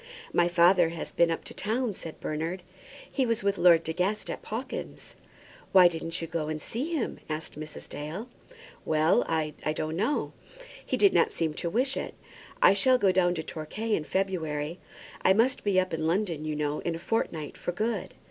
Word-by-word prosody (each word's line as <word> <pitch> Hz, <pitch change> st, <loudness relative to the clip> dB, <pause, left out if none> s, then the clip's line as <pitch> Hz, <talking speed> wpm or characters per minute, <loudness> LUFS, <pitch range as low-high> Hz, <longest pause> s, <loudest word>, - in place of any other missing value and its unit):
"My 175 Hz, -, +4 dB
father 175 Hz, 0 st, +5 dB
has 165 Hz, -1 st, -6 dB
been 170 Hz, 0 st, +3 dB
up 165 Hz, -, -3 dB
in -, -, -11 dB
town," 225 Hz, +2 st, -1 dB
said 165 Hz, -3 st, -8 dB
Bernard. 165 Hz, +4 st, -3 dB, 0.5 s
"He 270 Hz, -, +1 dB
was 230 Hz, -4 st, 0 dB
with 200 Hz, 0 st, +1 dB
Lord 170 Hz, -2 st, +6 dB
De 160 Hz, -, -3 dB
Guest 190 Hz, +5 st, -1 dB
at -, -, -6 dB
Pawkins's." 240 Hz, +5 st, -6 dB, 0.6 s
"Why 185 Hz, -2 st, +9 dB
didn't 165 Hz, 0 st, -3 dB
you -, -, -3 dB
go 165 Hz, -2 st, -2 dB
and 155 Hz, 0 st, -3 dB
see 255 Hz, -, -4 dB
him?" 270 Hz, -, -2 dB
asked 155 Hz, +1 st, -4 dB
Mrs. 155 Hz, 0 st, -8 dB
Dale. 160 Hz, +10 st, -6 dB, 0.6 s
"Well, 160 Hz, +8 st, +3 dB
I 160 Hz, -2 st, 0 dB, 0.2 s
don't 155 Hz, +1 st, -2 dB
know. 220 Hz, -, 0 dB, 0.5 s
He -, -, -1 dB
did 400 Hz, -, +5 dB
not -, -, +4 dB
seem 160 Hz, -2 st, -1 dB
to 170 Hz, +2 st, -3 dB
wish 260 Hz, +8 st, +1 dB
it. -, -, -4 dB, 0.5 s
I -, -, +8 dB
shall 255 Hz, +6 st, +4 dB
go 200 Hz, -6 st, +3 dB
down 180 Hz, -1 st, +2 dB
to 160 Hz, -, -3 dB
Torquay 190 Hz, +9 st, -4 dB
in 160 Hz, -, +1 dB
February. 165 Hz, -3 st, -2 dB, 0.4 s
I 190 Hz, -, +5 dB
must 240 Hz, +6 st, +2 dB
be 200 Hz, -3 st, +3 dB
up 185 Hz, -2 st, -1 dB
in 160 Hz, 0 st, -1 dB
London, 170 Hz, -3 st, 0 dB
you 155 Hz, -1 st, -2 dB
know, 150 Hz, 0 st, -1 dB
in 170 Hz, -, -2 dB
a -, -, -4 dB
fortnight, 165 Hz, -5 st, -2 dB
for -, -, -3 dB
good." 220 Hz, +6 st, -2 dB
175 Hz, 195 wpm, -28 LUFS, 160-210 Hz, 0.6 s, Why